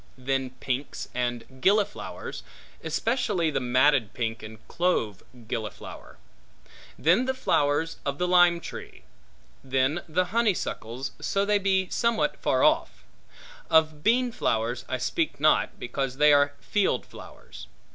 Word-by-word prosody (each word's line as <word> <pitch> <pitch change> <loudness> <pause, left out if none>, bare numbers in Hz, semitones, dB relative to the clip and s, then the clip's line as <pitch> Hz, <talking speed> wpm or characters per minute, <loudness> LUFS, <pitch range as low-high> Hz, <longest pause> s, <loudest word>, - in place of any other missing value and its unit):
Then 135 0 -1
pinks 135 +1 -4
and 125 +1 -4
gilliflowers, 205 +2 0 0.4
especially 220 -9 0
the 140 - 0
matted 130 -2 +2
pink 115 -1 -3
and 110 0 -12
clove 145 - 0 0.3
gilliflower. 110 -2 -7 0.8
Then 180 +11 +3
the 265 0 -1
flowers 155 - +1
of 140 0 -2
the 180 - 0
lime 175 -1 +5
tree. - - -9 0.6
Then 135 +5 0
the 180 +4 +1
honeysuckles, 140 - -1
so 195 0 0
they 205 0 +2
be 190 -1 +1
somewhat 235 -1 +1
afar - - 0
off. - - +2 0.7
Of 155 -2 +3
beanflowers 130 - 0
I 130 - -1
speak 145 +3 -2
not, 155 +1 +2
because 130 +1 -3
they 150 0 +6
are 145 0 +4
field 205 -2 0
flowers. - - -12
145 Hz, 125 wpm, -26 LUFS, 130-185 Hz, 0.8 s, they